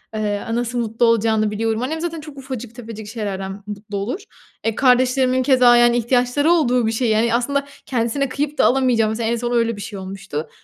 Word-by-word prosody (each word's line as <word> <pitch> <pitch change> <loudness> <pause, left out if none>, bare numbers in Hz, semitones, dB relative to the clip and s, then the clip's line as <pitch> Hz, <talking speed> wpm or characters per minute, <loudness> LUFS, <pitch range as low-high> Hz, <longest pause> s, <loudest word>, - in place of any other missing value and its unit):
Iıı, 205 -1 -2
a 230 - -2
nasıl 240 0 -1
mutlu 230 +1 0
olacağını 220 -2 +2
biliyorum. 225 +2 -1
Annem 315 +5 -3
zaten 330 -2 -4
çok 295 -2 -11
ufacık 250 -4 -7
tefecik 225 -3 -8
şeylerden 200 -3 -5
mutlu 205 0 -6
olur. 230 - -3 0.5
Eee, 225 - 0
kardeşlerimin 255 0 +3
keza, 250 -3 +5
yani, 240 0 +5
ihtiyaçları 245 +6 +2
olduğu 250 -9 +2
bir - - +1
şey, 230 +1 0
yani, 225 +2 +2
aslında 280 +4 0 0.2
kendisine 250 +2 -1
kıyıp 295 +3 -3
da - - +4
alamayacağı, 245 -4 +3
mesela, 225 +1 -2
en 235 - +1
son 240 +1 -3
öyle 230 -1 +1
bir 205 - -8
şey 200 -1 -7
olmuştu. 185 -5 -6
235 Hz, 195 wpm, -20 LUFS, 220-255 Hz, 0.5 s, keza